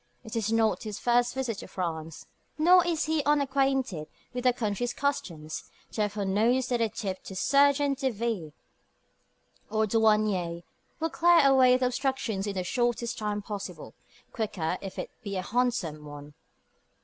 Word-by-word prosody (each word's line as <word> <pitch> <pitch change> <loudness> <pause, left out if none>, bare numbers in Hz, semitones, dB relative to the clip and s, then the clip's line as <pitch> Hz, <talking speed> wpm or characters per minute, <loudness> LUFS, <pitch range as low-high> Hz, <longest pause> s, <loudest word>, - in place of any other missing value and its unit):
It 220 -2 -8
is 220 -1 0
not 225 -1 +2
his 215 -2 -5
first 245 +1 +2
visit 250 -6 -2
to - - -8
France, 165 -3 -5 0.3
nor 355 +3 +6
is 330 -2 0
he 315 -1 0
unacquainted 270 - +1 0.3
with 250 0 -4
that 250 -1 +3
country's 220 +2 -2
customs; 170 - -3 0.2
therefore 210 -1 -1
knows 235 +6 +2
that 240 -2 +1
a 225 - +2
"tip" 200 -4 -4
to 190 - -8
sergent 280 +4 +3
de 270 -2 +1
ville 220 -8 -3 1.2
or 220 0 +1
douanier 210 -6 +2 0.4
will 325 0 -1
clear 340 -3 +5
away 260 -2 +6
the 255 - 0
obstructions 250 -6 -1
in 200 - -3
the 185 - -1
shortest 240 +3 -1
possible 210 -1 -5
time - - -31
quicker 185 -7 -2
if 195 -1 -7
it - - -5
be 200 -4 -4
a 185 - -2
handsome 210 -9 -1
one. 145 0 -10
225 Hz, 155 wpm, -28 LUFS, 195-260 Hz, 1.2 s, nor